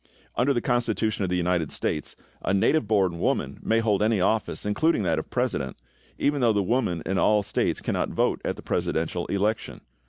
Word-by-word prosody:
Under 125 +4 +2
the 120 -3 +1
Constitution 110 -4 0
of 95 - -1
the 90 - 0
United 90 -3 0
States 75 - -2 0.3
a 95 - 0
native 110 +6 +2
born 95 -5 +2
woman - - -1
may 115 +1 +2
hold 105 -3 +1
any 110 -1 +2
office, 105 +4 0
including 110 +4 +2
that 80 -4 +1
of 80 - -7
president, - - -1 0.4
even 145 -1 +1
though 115 -2 +4
the 100 -1 +1
women 95 -6 0
in 95 - 0
all 105 - +4
of 105 - -1
the - - -7
States - - 0
cannot - - -1
vote - - 0
at - - -2
the - - -11
presidential 85 +2 -1
election. 105 +2 -1
105 Hz, 200 wpm, -26 LUFS, 90-115 Hz, 0.4 s, though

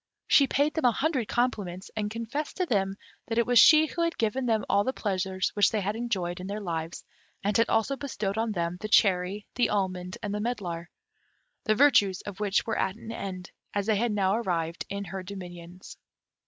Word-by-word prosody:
She 280 - +5
paid 285 +3 +1
them 320 - -1
a 245 - +6
hundred 270 -3 0
compliments, 205 -8 -2
and 210 -1 -1
confessed 230 +7 -4
to 370 - +1
them 195 - 0 0.3
that 225 - -2
it 235 - +3
was 245 -1 +5
she 310 +5 +8
who 335 - -4
had 335 0 0
given 240 +3 0
them 220 -2 +1
all 200 0 +3
the 260 - -1
pleasures 190 -3 -1
which 205 -2 +4
they 220 - -1
had 205 +3 -2
enjoyed 190 -7 -2
in 185 - -6
their 205 +2 -4
lives, 165 -4 -4 0.4
and 205 +1 0
had 230 - +3
also 225 +5 +1
bestowed 215 -8 -3
on 225 0 0
them 170 -1 -2
the 215 - -3
cherry, 195 0 +3
the 245 - +2
almond, 185 -2 -2
and 205 -1 -2
the 210 - -2
medlar, 180 -8 -3 0.8
the 215 - +3
virtues 215 -9 +4
of 205 -1 -8
which 205 -2 +1
were 225 - -1
at 190 - 0
an 225 0 -9
end, 185 -4 -6 0.2
as 200 -1 0
they 220 0 +2
had 230 +3 +1
now 195 -1 +2
arrived 170 -7 -2
in 200 0 -3
her 190 -1 -5
dominions. 180 -2 -10
205 Hz, 210 wpm, -28 LUFS, 185-235 Hz, 0.8 s, she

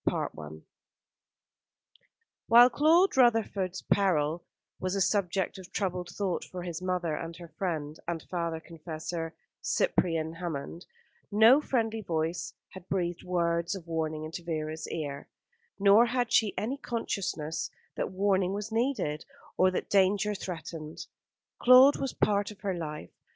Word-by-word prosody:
CHAPTER - - -2 0.2
VIII 80 +1 -12 1.8
While 240 +2 +8
Claude 330 +7 +4
Rutherford's 220 -7 +2
peril 170 -4 +1 0.4
was 185 +1 -2
a - - 0
subject 190 -1 0
of 190 0 -12
troubled 180 -3 -2
thought 195 -4 -1
for 180 -1 -7
his 175 -1 -5
mother 180 -3 -1
and 165 +2 -6
her 170 -1 -11
friend 160 -5 -4
and 170 -2 -3
father 170 -2 -3
confessor, 165 0 -6 0.3
Cyprian 165 - 0
Hammond, 165 0 -6 0.4
no 225 +7 +7
friendly 225 -6 -1
voice 165 -2 -2 0.2
had 185 -1 -12
breathed 175 -2 -1
words 170 0 0
of 185 -4 -8
warning 160 -2 -2
into 165 +3 -6
Vera's 155 -1 -4
ear; 145 -3 -4 0.5
nor 205 +4 +6
had 245 -1 -1
she 215 -3 +3
any 250 +6 -2
consciousness 190 - -3 0.3
that - - -2
warning 190 -1 +1
was 210 +2 -4
needed, 225 - -1 0.3
or 185 - +4
that 185 - -3
danger 200 +2 +3
threatened. 165 -4 -6 0.6
Claude 255 +3 +8
was 270 - -2
a - - +2
part 205 -1 0
of 210 -1 -12
her 195 -2 -1
life. 150 - -6
180 Hz, 140 wpm, -29 LUFS, 165-205 Hz, 1.8 s, While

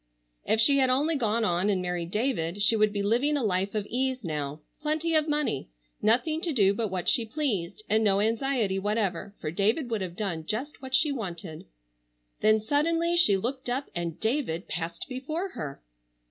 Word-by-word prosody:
If 220 - +3
she 280 +5 +5
had 260 -1 +4
only 290 +6 +2
gone 230 -3 +1
on 180 +1 +1
and 195 -2 +2
married 180 -2 -2
David 205 -4 -1
she 225 - +5
would 215 -1 +3
be 200 -1 -2
living 250 +8 +2
a 275 - -1
life 195 0 0
of 210 -2 -1
ease 260 0 -1
now—plenty 170 - -3
of 310 0 +3
money—nothing 225 - -1
to 335 - 0
do 200 -8 +4
but 220 +2 -1
what 185 -2 -3
she 235 - +3
pleased 215 - -2
and 220 +2 +2
no 200 -2 +3
anxiety 225 -2 +1
whatever, 200 -2 -1
for 155 - -3
David 220 - +1
would 220 -3 0
have 180 -2 -4
done 180 -6 -3
just 235 - -4
what 260 -1 -1
she 300 +2 +3
wanted. 180 - -6 0.7
Then 215 0 +4
suddenly 330 +8 +1
she 275 - +5
looked 255 +5 -3
up 260 +3 -2
and 170 -3 -3
David 220 - -1
passed 170 0 -4
before 310 +9 -4
her! 145 - -7
220 Hz, 180 wpm, -28 LUFS, 185-270 Hz, 0.7 s, she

